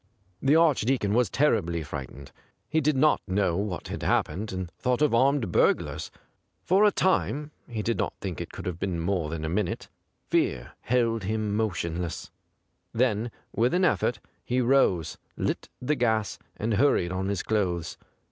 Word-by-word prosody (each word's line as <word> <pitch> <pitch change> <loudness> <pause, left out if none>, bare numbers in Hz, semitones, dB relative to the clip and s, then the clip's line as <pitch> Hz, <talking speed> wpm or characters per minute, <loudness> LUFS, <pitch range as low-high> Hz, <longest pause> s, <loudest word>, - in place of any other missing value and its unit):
The 140 +3 +4
Archdeacon 135 -9 +3
was 120 0 +3
terribly 85 - +1
frightened. 70 -1 -8 0.4
He 160 +1 +1
did 150 -1 +2
not 150 +3 +4
know 95 -2 +1
what 100 -3 -3
had - - -5
happened, 105 +4 0
and 95 -2 -4
thought 125 -1 +1
of 150 - +3
armed 130 -4 +3
burglars. - - +1 0.5
For 190 +4 +4
a 210 - +5
time 150 -6 0
— - - -40
he 110 -3 -4
did 115 +1 -1
not - - -1
think 90 -5 -4
it - - -7
could - - -8
have 85 -2 -4
been 90 -3 -2
more 85 -2 -1
than 80 0 -4
a - - -1
minute 90 +2 -2 0.2
— - - -48
fear - - +1
held 115 -4 +1
him 105 0 -1
motionless. 90 -5 -2 0.6
Then 115 -1 +1 0.2
with 120 +7 +2
an 185 +1 +3
effort 120 -9 +1 0.2
he 125 +1 0
rose, 120 - +2 0.2
lit - - -2
the 125 +4 0
gas, 110 -6 0 0.2
and 110 +1 -1
hurried 100 -7 +3
on 95 +1 -2
his 100 -3 -1
clothes. 90 -6 -1
110 Hz, 170 wpm, -27 LUFS, 90-130 Hz, 0.6 s, a